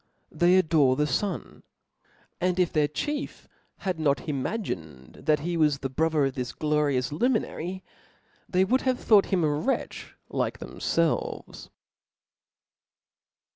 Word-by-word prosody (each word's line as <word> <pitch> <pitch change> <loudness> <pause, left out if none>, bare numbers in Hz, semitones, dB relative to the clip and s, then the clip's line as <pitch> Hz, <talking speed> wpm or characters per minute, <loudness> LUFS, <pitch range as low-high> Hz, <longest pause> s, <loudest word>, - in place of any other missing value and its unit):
They 175 +1 +4
adore 155 -7 +4
the 150 - +1
fun; 200 +6 -3 0.8
and 180 0 0
if 180 -2 +2
their 150 -2 +3
chief 290 - -4 0.3
had 185 -4 -3
not 145 -1 +1
imagined 95 - -4
that 150 -2 +3
he 170 +3 -2
was 150 -3 +3
the 135 -1 -5
brother 155 0 +2
of 135 - -1
this 125 -3 -4
glorious 150 -4 0
luminary, 190 - -1 0.7
they 185 +1 +3
would 255 +7 +2
have 255 -1 0
thought 210 -3 +5
him 185 -4 +1
a 155 - +3
wretch 155 - -2
like - - -2
themfclves. 165 -1 -2
160 Hz, 130 wpm, -27 LUFS, 145-185 Hz, 0.8 s, thought